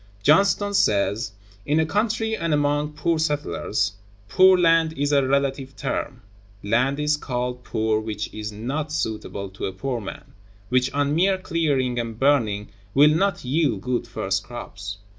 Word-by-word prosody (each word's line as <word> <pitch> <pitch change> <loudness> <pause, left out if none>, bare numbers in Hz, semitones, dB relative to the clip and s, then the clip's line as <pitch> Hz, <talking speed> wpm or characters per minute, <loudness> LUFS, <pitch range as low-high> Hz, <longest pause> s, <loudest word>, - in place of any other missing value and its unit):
Johnston(133) 200 +6 +4
says: 105 - +2 0.3
"In 150 +7 +1
a 160 - +3
country 220 +5 0
and 165 -6 0
among 145 +1 0
poor 160 +2 0
settlers... 145 - -1 0.3
poor 185 +4 +6
land 165 -2 +3
is 145 0 -1
a 140 -2 +3
relative 135 0 0
term. - - -4 0.4
Land 125 +7 +1
is 150 0 +2
called 125 -2 -3
poor 110 -2 0
which 110 -1 -5
is 105 0 -5
not 135 +9 -4
suitable 110 -8 -3
to 95 - -6
a 95 - -5
poor 120 +5 -3
man, 95 - -9 0.4
which 130 +1 +2
on 145 0 0
mere 190 +4 +3
clearing 145 -9 0
and 115 -2 -4
burning 115 -7 +1 0.3
will 150 +2 +6
not 185 -1 0
yield 130 - +1
good 125 +1 -2
first - - -2
crops. 100 0 -7
140 Hz, 155 wpm, -23 LUFS, 110-160 Hz, 0.4 s, poor